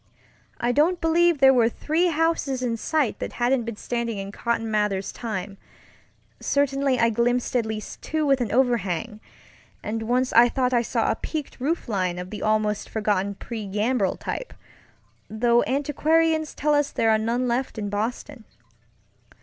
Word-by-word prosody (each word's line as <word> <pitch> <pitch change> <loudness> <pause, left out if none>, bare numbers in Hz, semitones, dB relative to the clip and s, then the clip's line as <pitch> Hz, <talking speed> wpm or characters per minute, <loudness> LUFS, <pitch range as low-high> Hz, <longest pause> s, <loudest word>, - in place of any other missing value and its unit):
I 240 - +1
don't 320 +7 +2
believe 335 0 +3
there 270 -1 +6
were 235 -3 +4
three 320 +8 0
houses 320 -5 0
in 235 -2 0
sight 290 +1 -1
that - - -5
hadn't 240 0 +1
been 230 -1 -5
standing 235 0 -3
in 195 0 -5
Cotton 225 0 -2
Mather's 210 -2 0
timeŌĆöcertainly 255 +6 -3
I 230 0 +3
glimpsed 245 +3 0
at 235 -3 +1
least 215 -1 -6
two 310 0 -1
with 275 -2 +3
an 230 - -2
overhang, 225 -4 0 0.6
and 225 +2 -3
once 250 +3 0
I 240 +1 +7
thought 255 0 0
I 240 - +4
saw 235 - 0
a - - -1
peaked 305 -4 -6
roof 305 +5 -1
line 185 -5 -1
of 180 +1 -7
the 210 - -6
almost 215 -1 0
forgotten 200 -2 -1
pre 220 0 -6
gambrel 210 0 0
type, - - -6 0.7
though 235 +2 +3
antiquarians 315 +3 +1
tell 300 +1 +1
us 290 -1 +2
there 225 - +1
are 220 - +3
none 235 +3 0
left 245 +1 -2
in 205 -1 -3
Boston. 230 +4 -4
240 Hz, 160 wpm, -24 LUFS, 215-275 Hz, 0.7 s, I